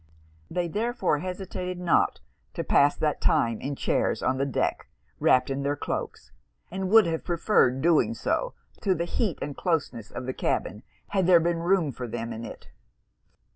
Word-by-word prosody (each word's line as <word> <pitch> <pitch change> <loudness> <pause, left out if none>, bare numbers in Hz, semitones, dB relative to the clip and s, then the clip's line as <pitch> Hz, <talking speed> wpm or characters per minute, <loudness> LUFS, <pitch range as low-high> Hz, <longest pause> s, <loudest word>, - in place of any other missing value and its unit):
They 175 0 -1
therefore 205 - 0
hesitated 185 0 -5
not 175 -2 +2 0.3
to - - -2
pass 145 +1 +4
that 150 -2 -1
time 115 -2 +2
in 140 +1 -3
chairs - - 0
on 130 0 +1
the 140 - +1
deck, 135 - -1 0.3
wrapped 130 +1 +3
in 135 +1 -2
their 140 +1 0
cloaks; - - -5 0.4
and 190 0 -3
would 220 +1 +7
have 165 -1 -2
preferred 165 - +2
doing 170 +7 +3
so, - - -1 0.3
to 190 -3 +2
the 170 +1 -2
heat 195 - -1
and 145 0 -5
closeness 145 - -2
of - - -6
the 130 - -3
cabin, - - -2 0.3
had 190 -3 +1
there 180 -2 +7
been 170 0 0
room 170 -3 +2
for 125 0 -6
them 115 0 -4
in 110 +1 -7
it. - - -10
165 Hz, 175 wpm, -26 LUFS, 135-185 Hz, 0.4 s, would